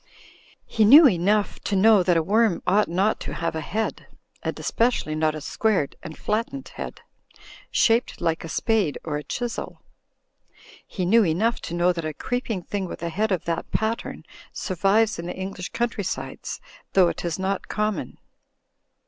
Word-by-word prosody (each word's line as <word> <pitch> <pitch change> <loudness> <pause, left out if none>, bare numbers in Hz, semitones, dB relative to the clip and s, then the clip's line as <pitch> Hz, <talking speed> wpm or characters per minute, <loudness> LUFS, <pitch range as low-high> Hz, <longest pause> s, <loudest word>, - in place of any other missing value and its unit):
He 220 - +1
knew 285 +9 +9
enough 200 +1 +1
to 200 - -2
know 210 +1 +6
that 175 -1 +3
a 165 - +2
worm 210 +1 +2
ought 205 +3 +3
not 190 +6 +1
to - - -6
have 165 -1 -2
a 160 - -2
head, 220 +8 -3 0.3
and - - -4
especially 230 -9 0
not 155 0 +1
a 155 - -6
squared 190 -1 0
and 155 - -9
flattened 230 +5 -2
head, - - -7 0.7
shaped 230 +2 +2
like 165 -1 -1
a 165 - -7
spade 210 -5 +1
or 150 -2 -2
a 150 - -6
chisel. 240 +6 -5 1.0
He 185 - -3
knew 225 +5 +5
enough 205 +7 +1
to 170 - -4
know 175 +1 +3
that 165 -1 -4
a 155 -1 -4
creeping 235 - -3
thing 200 +2 -3
with - - -8
a 170 - -1
head 210 +5 -1
of 185 -4 -1
that 170 -1 -2
pattern 220 +1 -2 0.3
survives 200 +3 +1
in 170 - -5
the 180 - -5
Eng 190 +1 -4
lish 180 +1 -6
country 235 -3 -2
sides, - - -5 0.3
though 185 -2 +6
it - - -3
is 170 -2 -2
not 190 +1 -2
common. 210 0 -2
195 Hz, 175 wpm, -24 LUFS, 170-220 Hz, 1.0 s, knew